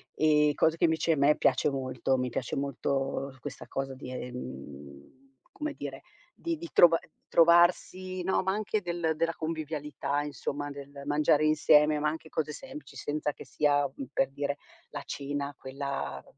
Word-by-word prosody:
Ehm, 150 -1 +4
cosa 160 +2 +2
che - - +4
invece 160 0 +2
a - - -1
me 145 +2 +5
piace 150 - +3
molto, 130 -1 -1
mi 125 0 -1
piace 120 +1 -3
molto 135 0 -2
questa 145 -2 -7
cosa 135 0 -3
di, 130 -1 -8
ehm, 70 - -8 0.4
come 300 -1 -4
dire, - - -7 0.3
di 335 -1 -3
di 335 0 -8
trov 170 -1 +7 0.3
trovarsi, 175 +2 +4
no, 190 - +2
ma 190 +1 +1
anche 215 0 -1
del 170 -2 -1
della 165 0 +1
convivialità, 150 -3 -2
insomma, 145 0 -4
del 140 0 -9
mangiare 150 +1 +3
insieme, 150 0 +5
ma 150 - +1
anche 160 0 -7
cose 150 -1 -2
semplici, 270 - -10
senza 150 0 -2
che - - -11
sia, 145 -1 +2
mhmm, 135 - -6
per 135 - +2
dire, 140 0 -2 0.4
la - - -5
cena 140 0 -3
quella 140 +1 -4
150 Hz, 160 wpm, -29 LUFS, 140-165 Hz, 0.4 s, trov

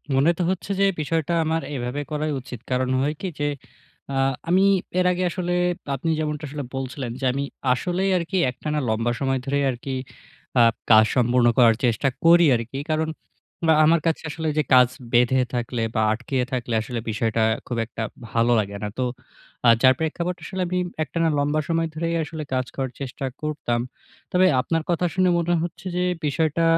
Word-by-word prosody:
মনে 140 +5 +4
তো - - -2
হচ্ছে 190 +2 -4
যে 200 - +5 0.2
বিষয়টা 160 +2 -1
আমার 160 +1 0
এভাবে 125 +3 -3
করাই 150 0 -1
উচিত। 125 -2 -9
কারণ 130 0 +1
হয় 145 +2 0
কি 190 - -2
যে, 145 - 0 0.7
আ - - -2 0.3
আমি 185 +2 +4 0.4
এর 180 - +2
আগে 180 +1 -1
আসলে 175 +1 -2 0.4
আপনি 150 +5 -3
যেমনটা 150 -1 -2 0.3
বলছিলেন 130 -2 -4
যে, 135 - -2
আমি 140 +1 -1 0.3
আসলেই 180 +8 -1
আরকি 175 +3 -2
একটানা 150 +4 -3
লম্বা 115 +2 0
সময় 135 -1 0
ধরেই 140 0 0
আরকি 130 +2 -5 0.7
আপ 115 -1 +5 0.2
কাজ 110 0 +8
সম্পূর্ণ 120 0 +3
করার 115 -3 +6
চেষ্টা 120 +4 +1 0.2
করি 170 +1 +7
আরকি। 120 +4 -4
কারণ, 155 0 0 0.6
বা 160 - +6
আমার 165 +1 +5
কাছে 165 - 0
আসলে 160 +1 -4
যে 155 - +3
কাজ 125 -1 +7 0.3
বেঁধে 125 +2 +4
থাকলে 120 -1 -2
বা, 110 - +2
আটকিয়ে 125 +3 -2
থাকলে 120 -2 -2
আসলে 120 +1 -4
বিষয়টা 110 +1 0 0.2
খুব 120 - -3
একটা 110 0 -6 0.3
ভালো 115 +1 +2
লাগে 100 -1 -3
না। 105 - -2
তো 125 - +1 0.6
আ - - +9
যার 130 0 +8
প্রেক্ষাপট 170 +3 -2
আসলে 190 -1 -4
আমি 180 - -1 0.3
একটানা 165 +1 0
লম্বা 145 +2 +1
সময় 165 0 +1
ধরেই 165 +1 -1
আসলে 155 0 -6
কাজ 130 0 0
করার 135 -2 -2
চেষ্টা 135 0 -5 0.2
করতাম। 150 -6 -1 0.5
তবে 185 +1 +4
আপনার 165 +3 -1
কথা 175 +1 +1
শুনে 185 -1 +3
মনে 170 +1 +1
হচ্ছে 175 +1 -7
যে 180 - +1 0.2
বিষয়টা 155 +2 +1
145 Hz, 175 wpm, -23 LUFS, 125-165 Hz, 0.7 s, আ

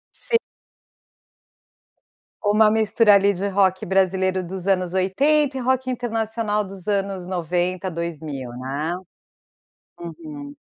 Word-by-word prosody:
Si 460 - +1 2.0
Uma 210 +1 +4
mistura 220 0 +4
ali 200 +1 +4
de 195 +3 -2
rock 190 -1 +2
brasileiro 190 0 +1
dos 185 +1 -6
anos 185 -2 +1
80 270 +10 +2
e - - -2
rock 260 +1 0
internacional 225 -3 -1
dos 195 0 -10
anos 195 -2 -1
90, 180 +1 -1
2000, 155 -6 -5
né. 140 +7 -3 1.0
Uhum. 285 - -8
195 Hz, 105 wpm, -22 LUFS, 180-220 Hz, 2.0 s, Uma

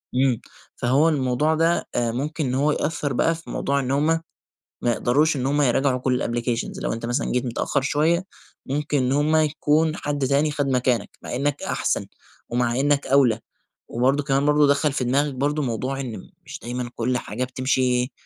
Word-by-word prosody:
إمم، 130 -3 +2 0.3
فهو 135 +6 +3
الموضوع 145 +1 +1
ده 165 +2 +1
آآ 120 -1 +1
ممكن 145 +5 -2
إن 125 0 -1
هو 145 +3 +2
يأثر 145 -2 -1
بقى 165 +6 +2
في 165 - -12
موضوع 140 0 0
إن 130 -1 -2
هُم 145 +2 +2 0.8
ما 120 - +2
يقدروش 145 +7 +2
إن 130 -1 -1
هُم 145 +2 +2
يراجعوا 135 0 +2
كل 125 0 0
الApplications 120 0 -2
لو - - -1
أنت 115 +1 -4
مثلًا 120 +4 -1
جيت 125 +1 0
متأخر 125 +3 -1
شوية، 155 +6 +1 0.4
ممكن 145 +1 -1
إن 130 0 +1
هُم 150 +3 +2
يكون 155 +1 +2
حد 145 -4 -2
تاني 140 +3 +2
خَد 145 -1 -1
مكانك، 125 -2 +1
مع - - -5
إنك 145 +2 -1
أحسن، - - -1 0.4
ومع 120 +1 0
إنك 145 0 +2
أَولى، 130 -5 +3 0.5
وبرضو 135 +5 +1
كمان 140 0 +1
برضو 150 0 +4
دخّل 140 +1 +2
في 135 - -1
دماغك 140 +4 +1
برضو 145 +3 0
موضوع 130 +1 -2
إن 120 -7 -6 0.2
مش - - -8
دايمًا 120 0 -4
كل 125 +2 0
حاجة 120 +1 -4
بتمشي 130 0 0
135 Hz, 180 wpm, -23 LUFS, 125-145 Hz, 0.8 s, برضو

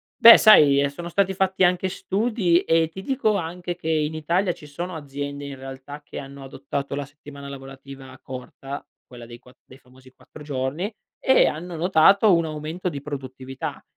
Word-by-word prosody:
Beh 230 - +10
sai, 145 -10 +7
ehm, 140 - +2
sono 170 +4 -8
stati 195 +2 +1
fatti 190 0 0
anche 180 +1 +2
studi 195 -3 0
e 165 0 +2
ti 190 +3 -9
dico 235 -4 0
anche 175 0 -4
che 160 -2 -6
in 155 -1 0
Italia 170 +4 0
ci 150 - -14
sono 170 +4 -6
aziende 140 -1 -6
in 140 - -7
realtà 135 +2 -9
che - - -10
hanno 140 0 -10
adottato 140 +1 -5
la 145 - -4
settimana 140 0 -12
lavorativa 135 -1 -11
corta, 135 +2 -8 0.2
quella 120 -1 -12
dei 120 0 -12
quatt 125 0 -20
dei 130 - -16
famosi 130 0 -20
4 - - -16
giorni, 145 - -3 0.3
e 265 - +4
hanno 170 +3 -5
notato 190 +5 +4
un 165 -1 +1
aumento 155 +4 -5
di 140 -4 -7
produttività. 135 -2 -7
150 Hz, 175 wpm, -23 LUFS, 135-180 Hz, 0.3 s, Beh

